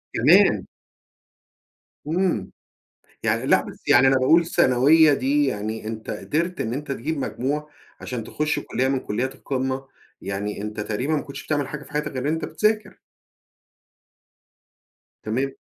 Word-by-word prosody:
كمان! - - +5 1.4
إمم. 165 - 0 0.7
يعني - - 0
لأ - - +4
بس - - -11
يعني 125 +2 +6
أنا 135 - +4
باقول 135 +6 +5
الثانوية 155 0 +4
دي 140 +2 +2
يعني 110 -2 -3
أنت 110 0 -5
قدرت 170 +4 -2
إن 110 - -2
أنت 140 +1 -4
تجيب 150 +4 -3
مجموعة 145 +3 -2 0.3
عشان 120 -3 -5
تخُش 150 +5 -1
كُلّية 130 +2 -1
من 135 -1 0
كُلّيات 130 +5 -3
القمة. 130 0 -3 0.3
يعني 100 +1 -4
أنت 105 0 -5
تقريبًا 110 +8 -2
ما 145 - -1
كنتش 140 0 -9
بتعمل 145 -3 -1
حاجة 150 0 -7
في 140 - -16
حياتك 150 0 -2
غير 130 - -3
إن - - +2
أنت 160 0 -2
بتذاكر. 215 +6 -1 2.2
تمام. 130 +6 -1
135 Hz, 140 wpm, -23 LUFS, 120-150 Hz, 2.2 s, يعني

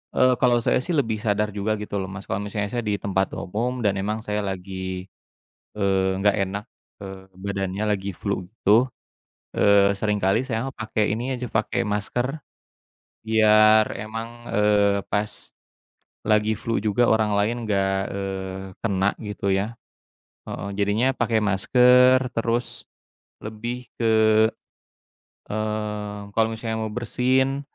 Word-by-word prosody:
eee, 130 0 +5
kalau 120 -2 +3
saya - - +2
sih 170 +5 -2
lebih 115 -6 0
sadar 105 -1 0
juga 105 +2 -1
gitu 105 -1 -4
loh, 95 - -3
Mas. 95 +1 -8
Kalo 95 - -3
misalnya 105 0 -3
saya 120 -1 -2
di 105 - +1
tempat 95 -1 -1
umum 120 +6 -3
dan 100 -2 +1
emang 105 +3 -2
saya 105 -1 -2
lagi, 95 -1 -4 0.7
eee, 95 -2 0
nggak 100 0 +3
enak, 100 0 -2 0.4
eee, 95 -1 -8 0.2
badannya 100 0 -3
lagi 100 -1 -1
flu 100 +1 -3
gitu, 115 +3 +3 0.6
eee, 100 -1 +4
seringkali 105 +3 +1
saya 125 +2 -2
pakai 110 -4 -1
ini 125 +5 -2
aja, 125 -2 -6
pakai 110 +2 0
masker 120 +7 -2 0.9
biar 110 0 +5
emang, 115 +2 -7
eee, 105 -1 +3
pas 105 0 -3 0.7
lagi 110 0 +2
flu 115 +1 -2
juga 105 +3 +1
orang 110 -2 +2
lain 105 +3 +1
nggak, 95 -2 +1 0.2
eee, 95 -1 -4 0.2
kena 100 -2 +1
gitu 105 -2 -3
ya. 100 +4 -1 0.7
Heeh, 100 - -5
jadinya 105 +6 +2
pakai 115 -2 +1
masker 125 +5 +5
terus 115 +1 -2 0.5
lebih 120 +3 -6
ke, 110 -1 +3 1.1
eee, 105 -1 -4
kalau 110 +1 +3
misalnya 110 0 -3
mau 110 - -2
bersin, 130 +4 0
105 Hz, 135 wpm, -24 LUFS, 100-115 Hz, 1.1 s, eee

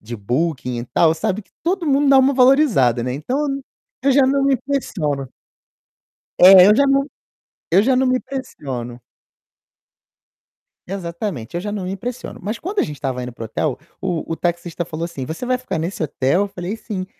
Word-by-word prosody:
de 120 +3 -7
Booking 125 +3 -2
e 120 - -4
tal, 160 +5 +3
sabe 190 +6 -2
que - - -34
todo 355 0 -1
mundo 285 0 +3
dá 270 -1 +7
uma 265 +1 +4
valorizada, 250 - +4
né. 125 +1 -2
Então, 155 - -3
eu 275 0 -4 0.4
eu 275 - +3
já 275 - +5
não 275 +1 +2
me 275 0 +4
impressiono. 160 - -2 1.1
É, 185 0 +9
eu 210 - +6
já 280 +5 +4
não 275 0 +2 0.6
eu 190 +4 +5
já 260 +3 +2
não 260 +1 +2
me 255 0 +2
impressiono. 130 - -6 1.9
Exatamente, 170 - -5
eu - - -1
já 205 - -4
não 200 -3 -4
me 185 - -3
impressiono, 240 +5 -6
mas 215 +4 -3
quando 395 +5 -5
a - - +5
gente 150 - -4
estava 130 -3 -3
indo 125 0 -6
para 115 - -10
o - - -3
hotel, 125 +5 -2 0.2
o 180 -4 -1
o 165 - -1
taxista 175 0 -2
falou 165 -1 -5
assim: 140 -6 -6
"Você 160 - -5
vai 255 0 +2
ficar 255 -9 -4
nesse 170 +3 -3
hotel?". 145 +4 +1
Eu 205 - -2
falei: 195 +2 -5
"Sim". 190 -5 -5
185 Hz, 195 wpm, -20 LUFS, -, 1.9 s, É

